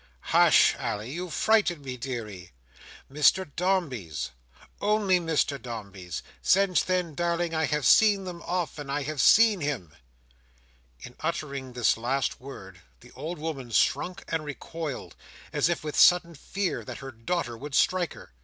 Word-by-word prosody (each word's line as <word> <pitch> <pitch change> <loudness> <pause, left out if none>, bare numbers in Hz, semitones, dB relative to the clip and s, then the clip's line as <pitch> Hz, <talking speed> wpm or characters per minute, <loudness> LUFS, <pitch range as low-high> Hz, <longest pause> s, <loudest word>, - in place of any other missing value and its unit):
"Hush, - - +6
Ally; 105 - -3
you 175 +6 -5
frighten 175 -3 +2
me, 130 -2 -5
deary. 115 - -6 0.6
Mr 150 +6 +4
Dombey's—only 175 - -1
Mr 155 -4 0
Dombey's. 100 -7 -7 0.2
Since 195 -1 +3
then, 180 -3 -1
darling, 170 +1 -1
I 160 0 +1
have 150 -3 -1
seen 205 - +5
them 175 -2 -7
often. 170 -5 -3
I 145 +1 -1
have 150 -1 -2
seen 220 -4 +6
him." 125 - -3 1.1
In 125 - -11
uttering 140 -5 -4
this 120 -2 +2
last 130 +4 -1
word, 95 -9 -11 0.2
the - - -16
old 155 +7 -6
woman 150 -5 -5
shrunk 180 - +1
and 165 -1 -2
recoiled, 150 0 -6 0.4
as - - +2
if 170 - -1
with 150 -1 -4
sudden 175 -1 +5
fear 175 - -3
that - - -7
her 135 0 -8
daughter 120 +2 -3
would 140 +4 -6
strike 180 -2 +2
her. - - -14
150 Hz, 145 wpm, -27 LUFS, 125-175 Hz, 1.1 s, Hush